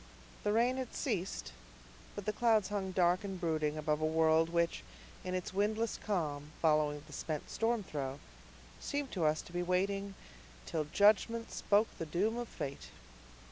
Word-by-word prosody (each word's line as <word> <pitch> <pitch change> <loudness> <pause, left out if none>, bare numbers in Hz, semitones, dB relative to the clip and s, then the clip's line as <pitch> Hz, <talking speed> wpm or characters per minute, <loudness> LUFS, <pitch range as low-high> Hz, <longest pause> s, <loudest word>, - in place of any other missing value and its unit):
The 205 - +2
rain 240 +4 +3
had 260 -2 -4
ceased, 180 - -2 0.6
but 205 - -6
the 215 - 0
clouds 220 -3 +3
hung 195 -2 -2
dark 180 0 +3
and 195 -2 -4
brooding 155 -3 0
above 150 0 0
a - - +2
world 160 0 +4
which, 170 0 +1 0.4
in 185 0 -2
its 185 0 -3
windless 215 +3 0
calm, 155 -7 -2
following 150 -2 +2
the 150 - -13
spent 155 +1 -4
storm 225 -1 +1
throe, 140 -5 -4 0.6
seemed 285 -2 -3
to 175 -5 0
us 155 0 +2
to 175 - -13
be 175 - 0
waiting 195 +2 0 0.5
"till 155 -2 -1
judgment 215 +7 +3
spoke 210 +2 +2
the 165 - -3
doom 195 +8 +1
of 240 -1 -3
fate." 140 -8 -6
180 Hz, 165 wpm, -34 LUFS, 155-210 Hz, 0.6 s, world